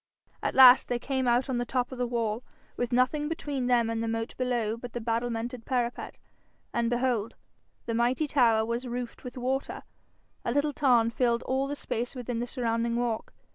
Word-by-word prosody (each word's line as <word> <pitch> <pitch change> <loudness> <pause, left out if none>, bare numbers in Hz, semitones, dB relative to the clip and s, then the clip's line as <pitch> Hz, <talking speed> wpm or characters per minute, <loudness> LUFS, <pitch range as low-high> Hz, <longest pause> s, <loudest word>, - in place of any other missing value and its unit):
At - - -2
last 255 -1 +9
they 245 - 0
came 260 +1 -2
out 245 +3 +3
on 255 -2 -1
the - - 0
top 250 +1 -1
of 260 - -7
the 245 - 0
wall, 230 -1 -1 0.3
with 245 - -2
nothing 255 +5 +2
between 285 -6 -3
them 240 -2 +3
and 225 0 -2
the 230 - -2
moat 225 0 -3
below 240 -4 -1
but 235 0 -9
the 240 - -3
battlemented 235 +1 -2
parapet, 245 -2 -2 0.6
and 235 -1 +1
behold! 240 -3 0 0.5
the 230 - -2
mighty 240 +6 +1
tower 235 -6 +3
was 235 +3 -3
roofed 245 -1 -5
with 250 0 -8
water: 260 +2 -2 0.6
a - - -1
little 285 +3 +1
tarn 240 -5 +3
filled 235 -1 +1
all 265 +1 0
the 290 - -3
space 245 -2 -4
within 245 -2 -3
the 240 - -2
surrounding 230 -2 -1
walk. 235 -2 -2
245 Hz, 190 wpm, -28 LUFS, 230-255 Hz, 0.6 s, last